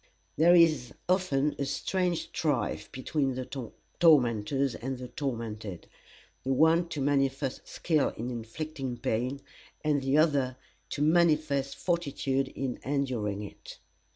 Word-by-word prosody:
There 170 +3 +6
is 155 -8 +4
often 150 -6 +2
a 140 - 0
strange 175 +5 -1
strife 140 -9 -1
between 135 0 -1
the 130 0 -4 0.5
tormentors 135 -4 +4
and 130 +1 -4
the 125 0 -8
tormented; 115 - -4 0.6
the 135 - -1
one 160 +4 +4
to 150 - -4
manifest 135 -1 0
skill 155 -4 +1
in 120 +3 -3
inflicting 130 +2 -5
pain, 125 +6 -1 0.4
and 150 -2 +2
the 135 +2 +2
other 140 -5 +2 0.3
to 145 - -1
manifest 155 -4 +2
fortitude 140 -6 -1
in 130 -2 -4
enduring 125 -7 -1
it. 100 - -10
135 Hz, 125 wpm, -29 LUFS, 125-155 Hz, 0.6 s, There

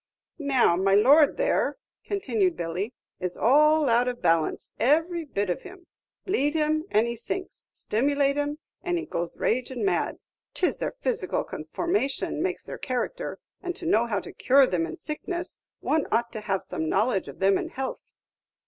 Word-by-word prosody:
"Now, 270 - +3
my 195 +2 +3
lord 280 +8 +6
there," - - +1 0.3
continued 230 - 0
Billy, 180 +8 -3 0.2
"is 180 -1 -3
all 300 +4 +5
out 240 +1 +3
of 245 -1 -2
balance, 165 -2 +1
every 325 +5 +2
bit 205 -8 -2
of 175 - -2
him. 370 -1 -12 0.4
Bleed 295 -6 +1
him, 310 0 +1
and 215 +2 +3
he 235 0 -3
sinks; 370 - -5
stimulate 280 +4 +1
him, 290 0 -1 0.2
and 355 -1 -1
he 335 - -3
goes 170 0 -4
ragin' 255 - -1
mad. 390 - 0 0.4
'T 370 - +2
is - - -1
their - - -2
physical - - -1
conformation 340 -5 -2
makes - - -2
their - - -8
character; 255 -2 -3 0.2
and 360 -2 -4
to 355 - -8
know 235 -7 +3
how 210 -4 0
to - - -10
cure 270 +1 +5
them 175 -8 0
in 155 - -7
sickness, 345 +3 -4 0.2
one 315 -1 +1
ought 235 +1 +1
to 215 - -6
have 195 -2 -1
some 160 - -3
knowledge 215 0 +1
of - - -9
them 195 0 +3
in - - -4
health." 265 0 -4
265 Hz, 175 wpm, -26 LUFS, 210-315 Hz, 0.4 s, lord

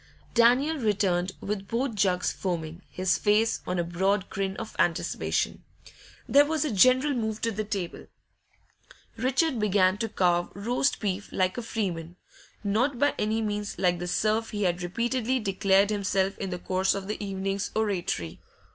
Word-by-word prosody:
Daniel 250 +7 +4
returned 195 -6 +1
with 195 -1 -4
both 245 +2 -1
jugs 190 -3 +1
foaming, 170 -2 -4
his 185 0 0
face 215 +2 +2
on 180 - -1
a 175 - +1
broad 190 +3 0
grin 195 -1 -2
of - - -7
anticipation. 170 0 0 0.6
There 285 +1 +6
was 310 0 0
a 295 - -1
general 255 +7 +4
move 220 -3 -2
to 230 - 0
the 215 0 -3
table. 200 -4 -5 1.1
Richard 260 +3 +1
began 200 -2 +3
to 225 - -1
carve 175 -4 +1
roast 245 +7 0
beef 200 -1 -3
like 185 -1 +1
a 245 - -3
freeman, 180 -7 -3 0.5
not 235 +7 +1
by 285 +3 +3
any 220 +1 0
means 210 -1 -3
like 180 -1 +1
the 175 - -4
serf 215 +4 +1
he 210 -1 -2
had 180 -1 0
repeatedly 240 +7 -1
declared 195 -1 +2
himself 195 -1 0
in 195 - -3
the 180 - -3
course 185 +2 0
of 195 -1 -5
the 210 0 -4
evening's 195 0 -2
oratory. 180 - -1
200 Hz, 160 wpm, -27 LUFS, 185-225 Hz, 1.1 s, There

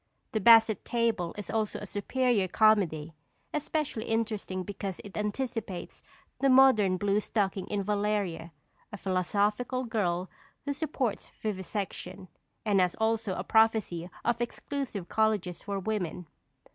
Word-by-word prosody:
The 220 - 0
Basset 225 0 +6
Table 230 -7 0
is 205 -3 -6
also 215 -2 -1
a - - -6
superior 210 +1 +1
comedy, 175 -7 +3 0.4
especially 300 -6 -2
interesting 215 -4 -2
because 195 -1 -5
it 200 - -11
anticipates 210 -3 -4 0.4
the 275 - +3
modern 255 -8 +6
blue 200 +1 +2
stocking 200 -3 -1
in 205 -1 -1
Valeria, 205 -5 -1 0.4
a 210 - -6
philosophical 205 +7 0
girl 190 -6 -1 0.4
who 285 - -1
supports 275 -7 -2
vivisection, 195 -2 -4 0.4
and 205 -2 +3
has 180 -1 +1
also 220 -3 0
a 180 - -3
prophecy 215 -6 +2 0.2
of 235 0 +1
exclusive 240 -5 -4
colleges 210 -5 0
for 200 -1 -3
women. 190 -4 -3
210 Hz, 125 wpm, -29 LUFS, 190-225 Hz, 0.4 s, Basset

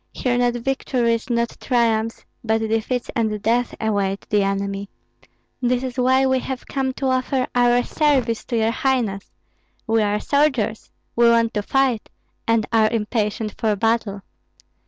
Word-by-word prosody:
Here 250 -1 0
not 245 0 +2
victories, 240 -2 -1
not 235 -1 0
triumphs, 230 -3 0 0.2
but 220 -1 +2
defeats 225 +3 -1
and 220 -2 0
death 235 +3 0
await 200 -3 -1
the 210 -1 +3
enemy. 195 0 -2 0.7
This 250 0 +1
is 255 -1 -4
why 260 +1 +3
we 260 0 +2
have 260 0 -5
come 265 -1 -1
to 270 - -4
offer 255 0 +1
our 245 0 +3
service 265 -7 +1
to 235 - -2
your 225 0 +2
highness. 235 -6 -1 0.6
We 225 -1 +2
are 210 0 +1
soldiers; 265 -7 0 0.3
we 235 0 +5
want 230 -1 +3
to 210 - 0
fight, 260 0 0 0.4
and 230 -1 +2
are 220 -1 +4
impatient 215 -1 -1
for 215 -2 +1
battle." 210 -2 0
230 Hz, 150 wpm, -21 LUFS, 215-250 Hz, 0.7 s, we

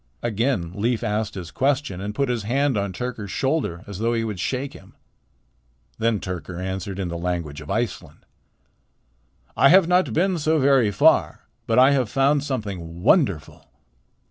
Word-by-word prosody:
Again 115 -6 -1
Leif 115 +4 -1
asked 105 -1 -2
his 90 -3 -7
question 135 -8 -1
and 105 +1 -5
put 140 - 0
his 120 -2 -1
hand 135 +5 0
on 100 -1 -1
Tyrker's 110 +1 -5
shoulder 130 - -1
as 100 -2 -8
though 115 +1 0
he 115 - 0
would 105 -5 -4
shake 130 +8 -3
him. - - -15 1.0
Then 115 -2 +1
Tyrker 90 -1 -6
answered 95 +1 -4
in 95 -3 -3
the 85 0 -5
language 85 -4 -3
of 75 - -11
Iceland: 115 -2 -4 1.3
"I 135 - +5
have 185 -1 +6
not 180 +1 +2
been 180 +1 +1
so 160 +1 +2
very 135 -5 +4
far, 100 - +3 0.3
but 115 - +1
I 130 +2 +7
have 130 -5 +1
found 140 +3 +2
something 95 - -5
wonderful." 100 - +1
110 Hz, 165 wpm, -23 LUFS, 95-135 Hz, 1.3 s, I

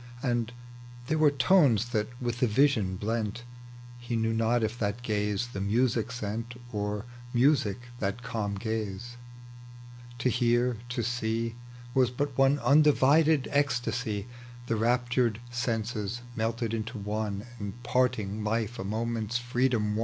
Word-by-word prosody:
And 120 -3 0 0.5
there 155 +5 0
were 155 -1 +6
tones 135 - +4
that 110 -3 0
with 120 -1 -2
the 125 - +3
vision 110 -5 +3
blent: 110 +3 -2 0.6
He 120 0 -3
knew 115 0 +1
not 115 +1 +2
if 110 +2 -2
that 105 +3 -2
gaze 105 0 -1
the 100 - -3
music 115 +3 +1
sent, 115 +1 -4
Or 105 +1 -2 0.3
music 120 -5 +3 0.2
that 100 +4 -2
calm 110 -5 -2
gaze; 110 +2 -4 1.0
to 125 - 0
hear, 120 0 +2
to 120 -1 -2
see, 115 0 -1 0.4
Was 130 -1 +4
but 140 +2 -2
one 135 +2 +4
undivided 150 +2 +5
ecstasy; 125 -6 0 0.4
The 115 - 0
raptured 120 0 +1
senses 115 -2 -2
melted 115 0 -1
into 115 +2 -3
one, 105 0 -3
And 100 +4 -6
parting 110 -5 0
life 110 +1 -1
a - - -2
moment's 115 +2 -1
freedom 120 -3 +1
won - - -1
115 Hz, 135 wpm, -29 LUFS, 105-125 Hz, 1.0 s, were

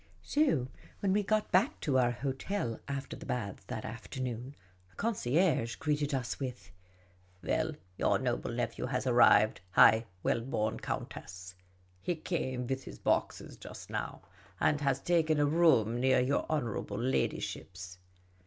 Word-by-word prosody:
So 270 - +2 0.3
when 195 -2 +2
we 210 - +3
got 215 +1 0
back 195 +9 +3
to 130 -3 +2
our 120 -1 +4
hotel 130 - -3
after 140 -1 -4
the - - -10
baths 100 -6 -3
that 110 - -5
afternoon, 125 +3 -5 0.3
the - - -27
concierge 165 - +1
greeted 150 0 -1
us 130 -3 -2
with: 125 -7 -6 0.3
" 90 0 -32
Well, 160 0 0 0.3
your - - +3
noble - - -2
nephew - - -2
has 130 0 -2
arrived, 110 -5 +5
high 110 +4 +7 0.2
well 115 - +1
born 110 -3 -1
countess! 90 -1 -6 0.5
He 175 - -1
came 130 -6 -2
with 135 +1 -3
his - - -9
boxes - - -1
just - - -10
now, - - -4 0.4
and 145 - +2
has 135 -2 +1
taken 160 -1 +2
a 145 - +4
room 145 -8 +4
near 130 0 +4
your 130 +3 +1
honourable 120 -8 -2
ladyship's." 95 -6 -2
130 Hz, 145 wpm, -32 LUFS, 115-155 Hz, 0.5 s, high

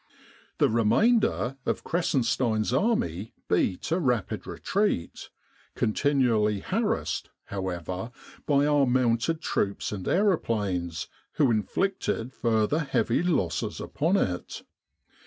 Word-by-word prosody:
The - - +4
remainder 125 - +2
of - - -2
Kressenstein's 120 -8 0
army 115 - 0
beat 90 - 0
a 170 - +2
rapid 125 - -1
retreat, 200 - -2 0.5
continually 110 -5 +2
harassed, - - -1
however, 95 +2 -4 0.4
by 145 -1 +3
our 145 -2 +3
mounted 125 +5 +1
troops 100 -7 -1
and 95 -3 -5
aeroplanes, 105 - 0 0.3
who 140 -5 +3
inflicted 125 - -1
further 115 +5 +1
heavy 140 0 +1
losses 155 - -1
upon 165 +7 0
it. 90 - -2
120 Hz, 100 wpm, -27 LUFS, 105-150 Hz, 0.5 s, The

